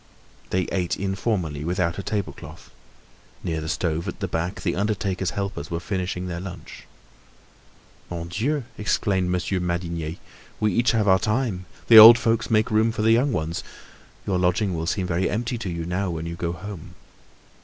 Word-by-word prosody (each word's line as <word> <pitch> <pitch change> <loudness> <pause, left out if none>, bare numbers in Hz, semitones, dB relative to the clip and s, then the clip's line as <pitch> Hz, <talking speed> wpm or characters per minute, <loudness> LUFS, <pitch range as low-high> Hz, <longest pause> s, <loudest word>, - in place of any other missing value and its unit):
They 95 0 +1
ate 90 -2 -1
informally, 95 -6 -2
without 85 +1 -1
a - - -1
tablecloth. 90 -6 -5 0.7
Near 80 -2 -2
the 80 - -5
stove 85 0 -1
at - - -5
the - - -2
back 85 +4 -3
the 85 - 0
undertaker's 100 -2 -1
helpers 100 -7 -3
were 85 - -2
finishing 90 0 -3
their 85 -1 -4
lunch. 90 -1 -9 1.2
"Mon 85 -1 -5
Dieu!" 130 - -1 0.2
exclaimed 95 -3 0
Monsieur 90 +1 -1
Madinier, 85 -2 -3 0.4
"we 105 -2 +1
each 120 +4 +2
have 110 -2 +1
our 95 -1 +5
time. 105 -5 -1 0.2
The 115 -2 +10
old 115 +2 +12
folks 115 -2 0
make 110 -1 +2
room 110 +1 +3
for 110 -1 -3
the 110 - +4
young 125 +5 +3
ones. 80 -4 -2 0.6
Your 95 -2 0
lodging 90 +2 +1
will 80 -1 -3
seem 95 +1 -1
very 90 +1 0
empty 120 +2 -2
to 105 -5 -4
you 85 -1 -4
now 90 +2 -1
when 80 -1 -4
you 85 - -4
go 85 0 -2
home." 95 -2 -9
95 Hz, 175 wpm, -24 LUFS, 85-105 Hz, 1.2 s, old